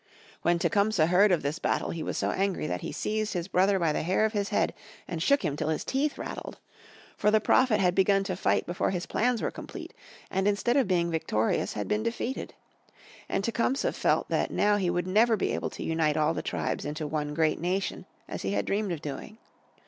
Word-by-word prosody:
When 175 +1 +2
Tecumseh 200 -1 +2
heard 185 +4 +5
of 175 - +2
this 145 +4 -2
battle - - 0
he 165 - -4
was - - -3
so - - 0
angry 195 -1 -1
that 90 0 -3
he - - -5
seized 215 0 -2
his 175 -1 -2
brother 195 +1 +3
by 165 -4 +1
the - - -1
hair 185 +6 +2
of 220 - -1
his 200 -1 -1
head 205 - +1 0.3
and 165 -2 -4
shook 280 - +3
him 145 -3 -1
till 150 - -2
his 155 - -1
teeth 280 +2 0
rattled. - - -6 0.6
For 210 - +2
the 215 +1 +4
Prophet 230 -1 +3
had 180 -2 +3
begun 195 +1 +3
to 190 -2 -3
fight - - +1
before 175 +1 -1
his 180 -2 -2
plans 245 0 0
were - - 0
complete, - - -9 0.4
and 190 +1 +1
instead 205 +4 +1
of 275 -6 +3
being 170 -2 +1
victorious 115 -9 0
had 105 - -3
been 210 +1 0
defeated. 235 +3 -3 0.7
And 195 - 0
Tecumseh 235 +4 0
felt - - +1
that - - +1
now 205 0 +2
he 185 -3 0
would 175 0 0
never 220 +4 +3
be - - 0
able - - -2
to - - -7
unite 160 -2 +1
all 155 -1 +2
the - - -3
tribes - - -2
into 150 +2 -4
one 150 -1 -3
great 160 -1 +2
nation 185 +3 -2 0.2
as - - -5
he 95 - -2
had 100 0 0
dreamed 200 -1 -1
of 160 -2 -4
doing. 150 +9 -6
185 Hz, 220 wpm, -28 LUFS, 160-210 Hz, 0.7 s, heard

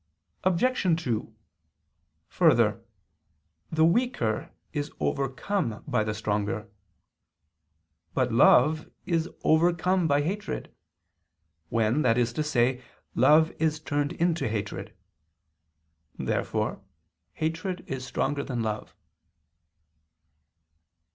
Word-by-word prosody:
Obj. 185 -3 +2
2: 115 -4 -2 1.0
Further, - - +3 0.9
the 160 0 +4
weaker 170 - 0 0.2
is 145 -1 -3
overcome 135 - -1
by 125 -6 +1
the 105 0 -3
stronger. 105 0 -2 1.4
But 125 -2 +1
love 150 +6 +5 0.2
is 170 -2 0
overcome 175 +2 +3
by 145 -1 +2
hatred: 200 +6 -4 1.0
when, 115 +5 +2
that 115 -4 +3
is 120 -1 +1
to 155 - -1
say, 125 -3 +1 0.3
love 155 +6 +5
is 155 -1 +1
turned 145 -2 -1
into 170 -3 0
hatred. 105 -2 -4 1.2
Therefore - - -2 0.5
hatred 175 +3 -3
is 130 -1 -5
stronger 140 +2 -1
than 120 -4 -3
love. 110 -1 -4
145 Hz, 90 wpm, -27 LUFS, 115-165 Hz, 1.4 s, love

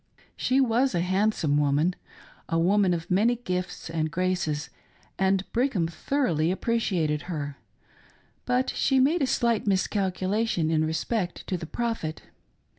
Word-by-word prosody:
She 260 +1 +1
was 255 0 +2
a - - +2
handsome 185 -5 +1
woman 150 +4 +2 0.3
— - - -23
a 165 - +1
woman 190 +3 +3
of 165 +2 -6
many 220 +6 +3
gifts 185 -6 -4
and 160 -1 -1
graces, 175 -3 -1 0.5
and 195 0 +2
Brigham 235 -8 +1
thoroughly 170 - 0
appreciated 185 -7 0
her; 145 -4 -4 0.9
but 250 +1 +1
she 270 -1 +2
made 300 +6 +3
a 270 - +2
slight 235 -4 +1
miscalculation 190 -2 0
in 155 -1 +2
respect 175 +4 -2
to 185 - -2
the 165 -2 -5
Prophet. 225 -8 -3
185 Hz, 135 wpm, -26 LUFS, 165-230 Hz, 0.9 s, woman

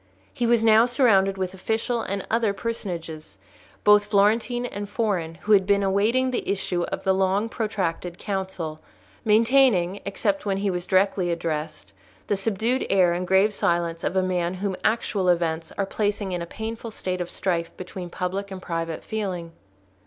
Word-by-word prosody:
He 240 - 0
was 235 -1 +3
now 225 +1 +6
surrounded 200 -6 +3
with 185 -1 -2
official 225 +5 -1
and 195 -2 -4
other 225 -2 +1
personages, 170 - -5 0.5
both 210 0 +6
Florentine 220 +4 +2
and 205 -4 -5
foreign, 195 -7 -1
who 215 - -1
had 195 -2 +5
been 200 0 +3
awaiting 220 +7 +2
the 250 - -3
issue 190 -3 -1
of - - -5
the 190 - +3
long 190 +3 +1
protracted 185 -6 -3
council, 190 -6 -4 0.4
maintaining, 220 -4 +3
except 290 +9 -1
when 195 -2 -1
he 200 0 0
was 180 0 -4
directly 190 -1 +2
addressed, 155 -10 -4 0.3
the 205 - 0
subdued 225 +5 0
air 185 -3 +4
and 180 +1 -3
grave 195 +3 +4
silence 170 -3 0
of - - -1
a 190 - +3
man 180 -1 -1
whom 195 0 -2
actual 210 -4 +1
events 165 -2 0
are 200 - +1
placing 205 -1 -2
in 175 -1 -2
a 170 - -5
painful 225 +4 -6
state 185 -4 -3
of 175 - -4
strife 170 -3 -1
between 180 -1 -7
public 190 +3 -3
and 190 -1 -8
private 165 -1 -3
feeling. 185 -6 -4
195 Hz, 165 wpm, -24 LUFS, 175-215 Hz, 0.5 s, now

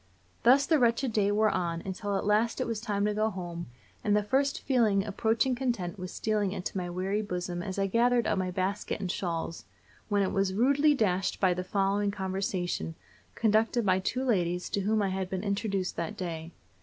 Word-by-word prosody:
Thus 265 +4 +6
the 315 0 +3
wretched 235 0 +2
day 205 -1 +2
wore 215 +1 +3
on, 170 -1 -2
until 195 +1 -2
at - - -3
last 215 +3 +2
it - - 0
was 225 -2 -3
time 205 -3 -1
to 210 - +1
go 215 +1 +1
home, 175 -3 -6 0.4
and 210 -1 +3
the 210 - +1
first 275 +6 +1
feeling 220 -7 +2
approaching 225 +5 +1
content 235 -8 -2
was 180 0 -5
stealing 210 -3 0
into 185 -1 -5
my 180 -2 -2
weary 190 +4 -1
bosom 180 -3 -3
as 190 0 -5
I 195 - +2
gathered 235 +4 +3
up - - +1
my 185 -1 -1
basket 190 +4 -2
and 185 -3 -2
shawls, 170 -3 -3 0.4
when 205 -1 +2
it 190 - 0
was 195 -1 0
rudely 280 +6 +4
dashed 195 -6 0
by 185 -2 +3
the 180 +1 -3
following 200 +2 +1
conversation, 190 -3 -2 0.4
conducted 225 +1 +2
by 185 -1 +3
two 250 +7 -2
ladies 180 -6 0
to - - 0
whom 210 +2 +1
I 195 - +1
had 190 -1 -2
been 190 0 -3
introduced 200 -2 -1
that 190 +6 -3
day. 165 -3 -4
200 Hz, 200 wpm, -29 LUFS, 185-220 Hz, 0.4 s, Thus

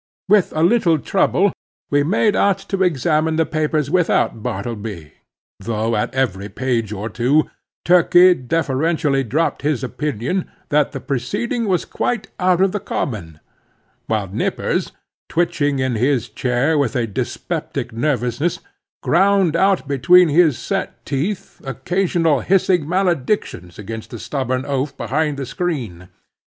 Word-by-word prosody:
With 200 -1 +4
a 155 - +1
little 175 -4 +3
trouble 195 +4 +1 0.4
we 145 0 +3
made 200 +7 +2
out 200 -1 +3 0.2
to 195 - 0
examine 160 -1 +1
the 160 0 +2
papers 155 -2 -1
without 175 -10 +1
Bartleby, 100 -6 -5 0.5
though 110 +2 -1
at 105 - -1
every 100 -7 -1
page 120 -5 -2
or 105 +1 -4
two, 125 +8 +1 0.3
Turkey 180 +1 +6
deferentially 145 0 0
dropped 145 +8 -1
his 145 -3 -1
opinion 145 - -2 0.2
that 150 -1 +2
this 135 - -7
proceeding 205 - -2
was 185 -3 +1
quite 220 -4 -2
out 180 -1 +2
of 195 0 +3
the 210 - -2
common; 95 - -4 0.7
while 110 -3 -1
Nippers, 95 - -2 0.4
twitching 145 -4 0
in 130 -1 0
his 120 0 0
chair 125 +7 0
with 135 -6 0
a 120 -2 +1
dyspeptic 105 +1 -4
nervousness, 125 +4 -1 0.4
ground 190 -1 +3
out 190 -3 +2
between 160 +6 +5
his 155 -3 +4
set - - -4
teeth 180 +9 -3
occasional 165 +2 0
hissing 180 -3 +2
maledictions 170 - -1
against 110 +2 -7
the 120 - -7
stubborn 130 +1 -2
oaf 140 0 -2
behind 145 +5 -1
the 140 - -4
screen. 125 - -4
145 Hz, 135 wpm, -19 LUFS, 120-175 Hz, 0.7 s, Turkey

